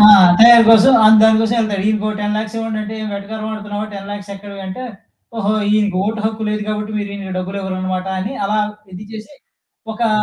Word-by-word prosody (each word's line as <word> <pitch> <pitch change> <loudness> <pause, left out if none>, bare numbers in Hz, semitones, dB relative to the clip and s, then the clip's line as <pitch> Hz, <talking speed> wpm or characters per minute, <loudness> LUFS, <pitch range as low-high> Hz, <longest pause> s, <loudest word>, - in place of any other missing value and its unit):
ఆ! 210 - +8 0.4
తయారు 235 0 +9
కోసం, 225 +4 +6
ఆహ్, 220 +1 +7
దాని 220 0 +5
కోసం 225 +1 0
వెళ్తాడు. 210 -4 -1
ఈయనకొక 215 0 -1
10,00,000 215 +1 -3
ఇవ్వండంటే, 220 -1 -4
ఏం 215 - -5
వెటకారం 215 +2 -6
ఆడుతున్నావా 210 -1 -6
10,00,000 200 +1 -8
ఎక్కడివి 200 0 -10
అంటే, 190 +7 -7 0.5
ఓహో! 210 -1 0 0.2
ఈయనకి 210 -3 +1
ఓటు 215 0 -3
హక్కు 220 0 -4
లేదు 210 0 -3
కాబట్టి 215 0 -4
మీరు 205 -1 -5
ఈయనకి 195 -2 -7
డబ్బులు 190 +2 -5
ఇవ్వరనమాట 185 0 -4
అని 205 +8 -4
అలా 210 +2 -1 0.3
ఇది 190 +4 -9
చేసి, 220 +7 -10 0.6
ఒకా 230 +1 -1
210 Hz, 180 wpm, -17 LUFS, 200-220 Hz, 0.6 s, తయారు